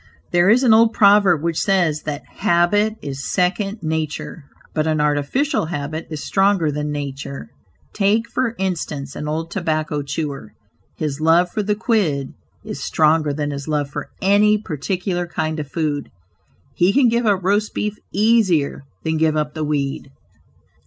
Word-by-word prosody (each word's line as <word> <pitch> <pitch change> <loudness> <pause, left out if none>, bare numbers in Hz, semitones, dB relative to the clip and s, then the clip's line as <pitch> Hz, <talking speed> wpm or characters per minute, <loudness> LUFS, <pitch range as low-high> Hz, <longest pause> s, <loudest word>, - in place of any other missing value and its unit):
There 175 +2 +4
is 245 +5 +5
an 235 -4 +6
old 225 0 +5
proverb 200 -6 +5
which 170 -1 0
says 175 -6 +1
that 145 -1 -3 0.2
"habit 205 +6 +2
is 140 -1 -5
second 195 +3 0
nature," 155 -1 -3 0.3
but 155 0 0
an 155 -1 +1
artificial 150 - 0
habit 155 0 -4
is 155 -2 -5
stronger 195 -5 +2
than 150 +1 -3
nature. 140 -1 -5 0.4
Take 215 +3 +2
for 245 -3 -1
instance, 160 -7 -3
an 150 - -5
old 160 +2 -3
tobacco 155 -5 -1
chewer; 140 -6 -5 0.4
his 150 -2 -3
love 170 +3 +4
for 215 - -1
the 205 0 0
"quid" 190 - 0 0.3
is - - -6
stronger 155 -1 +2
than 145 0 -2
his 140 -1 -6
love 145 -2 -1
for - - -5
any 205 +2 +4
particular 180 0 -3
kind 160 -2 -2
of 145 -2 -5
food. 150 -4 -2 0.6
He 175 +7 +3
can 270 -2 +5
give 235 0 +1
up 195 -3 +2
roast 205 +3 +1
beef 210 -1 -1 0.2
easier 200 -10 +2 0.2
than 160 0 0
give 155 0 +2
up 150 -1 -1
the 155 - -3
weed. 140 -2 -2
160 Hz, 160 wpm, -20 LUFS, 150-200 Hz, 0.6 s, an